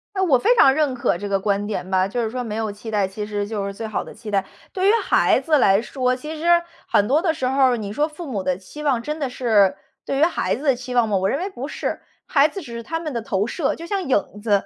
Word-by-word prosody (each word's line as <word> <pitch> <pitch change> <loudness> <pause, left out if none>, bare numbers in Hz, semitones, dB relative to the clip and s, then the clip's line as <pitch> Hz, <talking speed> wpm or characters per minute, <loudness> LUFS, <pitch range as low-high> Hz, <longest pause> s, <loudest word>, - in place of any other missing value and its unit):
诶， 380 - 0
我 300 -9 +4
非 475 - +3
常 270 - +6
认 290 -2 +1
可 240 -7 0
这 205 +2 -5
个 195 -1 +1
观 200 +1 0
点 205 -3 -4
吧， 190 0 +3
就 235 +4 -2
是 220 - -1
说 250 0 -3
没 215 -2 -5
有 220 -1 -2
期 210 +2 -9
待， 205 -3 +1
其 210 +2 -5
实 205 -1 -3
就 205 -2 -3
是 200 - -4
最 220 +2 -5
好 215 - -2
的 - - -11
期 215 -1 -9
待。 195 -1 +1 0.3
对 380 +1 +1
于 - - +7
孩 - - +3
子 310 -2 +2
来 200 -5 +4
说， 255 0 -1
其 300 +5 -7
实 345 +1 +4 0.2
很 205 - +3
多 295 +7 +3
的 330 -4 +1
时 300 -5 -3
候 270 +2 +1
儿， 240 - 0
你 205 -2 -5
说 295 +4 +1
父 320 +2 -9
母 230 -9 -3
的 185 -1 -1
期 195 +11 -11
望 270 -5 +1
真 300 +5 -4
的 275 -3 -1
是， 215 -7 +3 0.3
对 275 - -2
于 290 - +3
孩 335 - +1
子 265 - -8
的 275 -4 +3
期 250 0 -7
望 240 -2 +4
吗？ 205 -2 +1
我 190 +1 +1
认 275 - 0
为 380 +3 -3
不 275 -7 -6
是。 - - -4 0.3
孩 280 -1 +5
子 390 - -7
只 245 -8 -9
是 235 0 -6
他 325 +7 -3
们 310 -3 -5
的 235 - -2
投 205 -1 -1
射， 275 +3 -1
就 335 - -9
像 390 +2 -2
影 205 - -1
子。 225 - -2
245 Hz, 315 characters per minute, -22 LUFS, 205-300 Hz, 0.3 s, 于